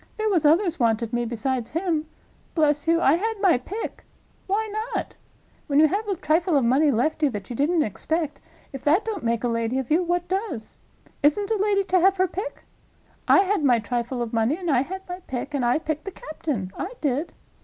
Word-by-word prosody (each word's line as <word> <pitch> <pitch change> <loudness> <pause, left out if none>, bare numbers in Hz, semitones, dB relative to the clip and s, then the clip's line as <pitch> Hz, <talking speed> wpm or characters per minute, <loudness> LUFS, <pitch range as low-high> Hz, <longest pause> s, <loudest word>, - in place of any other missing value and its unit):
There 435 0 0
was 330 -6 +3
others 340 +1 +3
wanted 230 -1 +1
me 240 0 0
besides 235 +2 -2
him. 330 -2 -1 0.5
Bless 300 -1 +2
you, 330 0 +4
I 305 -1 +4
had 445 +4 -1
my 370 -10 +4
pick. 405 - -6 0.4
Why 425 +3 0 0.3
not? - - -3 0.5
When 285 -1 +3
you 310 - +7
have 415 +5 -2
a 395 - 0
trifle 320 +1 +2
of 265 - +2
money 275 +6 +4
left 285 +6 0
you 295 - +4
that 205 -2 -6
you - - -3
didn't 310 +5 +2
expect, 310 - -2 0.3
if 270 - -7
that 325 +8 +3
don't 430 -6 -3
make 230 0 0
a - - +2
lady 230 +1 -1
of 265 0 -3
you, 325 +4 +4
what 350 0 -1
does? 380 - -4 0.4
Isn't 390 +9 +2
a - - +3
lady 400 0 +2
to 370 -1 +2
have 385 +2 +4
her 370 0 +3
pick? 400 +8 -6 0.6
I - - +7
had 395 -4 0
my 250 -4 +5
trifle 240 +2 -2
of 230 - -7
money, 230 +7 +1
and 350 -4 -2
I 255 -3 +4
had 380 +7 -6
my 360 0 -6
pick, 265 +3 -4
and 275 -3 0
I 240 +3 +3
picked 310 -1 -4
the 390 - -4
captain—I 300 - -5
did. 295 +3 -1
310 Hz, 210 wpm, -24 LUFS, 245-370 Hz, 0.6 s, you